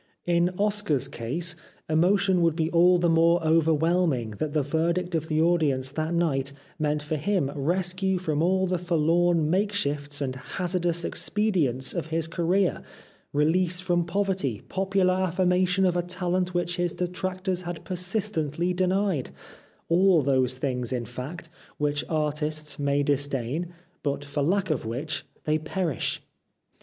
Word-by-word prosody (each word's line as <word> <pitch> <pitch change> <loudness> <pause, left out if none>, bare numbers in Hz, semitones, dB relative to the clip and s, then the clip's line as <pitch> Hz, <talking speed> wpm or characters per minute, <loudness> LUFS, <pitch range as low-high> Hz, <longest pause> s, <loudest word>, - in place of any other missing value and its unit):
In 175 0 +3
Oscar's 205 -9 +1
case 165 +9 -3 0.3
emotion 180 +3 +3
would 165 -2 +3
be 160 0 0
all 180 +1 +5
the 175 0 +2
more 165 +1 +4
overwhelming 160 -5 +2
that 155 - -1
the 150 -2 +2
verdict 170 +5 0
of 160 -1 -1
the 155 -1 0
audience 155 -6 +2
that 155 +2 -2
night 140 -5 0 0.3
meant 150 -1 0
for 155 +1 -2
him 160 -3 0
rescue 185 +5 0
from 155 -4 -1
all 190 +2 +2
the 180 -1 -1
forlorn 170 -1 +2
makeshifts 150 -8 -1
and 130 -2 -2
hazardous 175 +3 -2
expedients 165 - 0
of 170 -3 -3
his 165 0 -1
career, 175 +3 +1 0.5
release 170 +5 +2
from 175 -1 +1
poverty, 180 - -1
popular 190 -1 +1
affirmation 185 +1 +2
of 180 -1 +2
a 175 - +2
talent 180 0 -2
which 175 0 -1
his 175 -1 0
detractors 185 +1 -3
had 175 -2 -6
persistently 180 -3 -1
denied, 185 -4 0 0.6
all 175 -2 +4
those 130 -2 +2
things 125 -2 -2
in 125 -2 -2
fact, 130 +8 -7 0.3
which 145 0 0
artists 150 -1 -1
may 140 0 +1
dis 145 0 +1
dain 140 +5 -2 0.3
but 145 0 -2
for 145 +1 -2
lack 185 +4 +1
of 155 - -1
which 135 +8 -4 0.2
they 155 0 +1
perish. 160 -2 -2
170 Hz, 145 wpm, -26 LUFS, 150-180 Hz, 0.6 s, all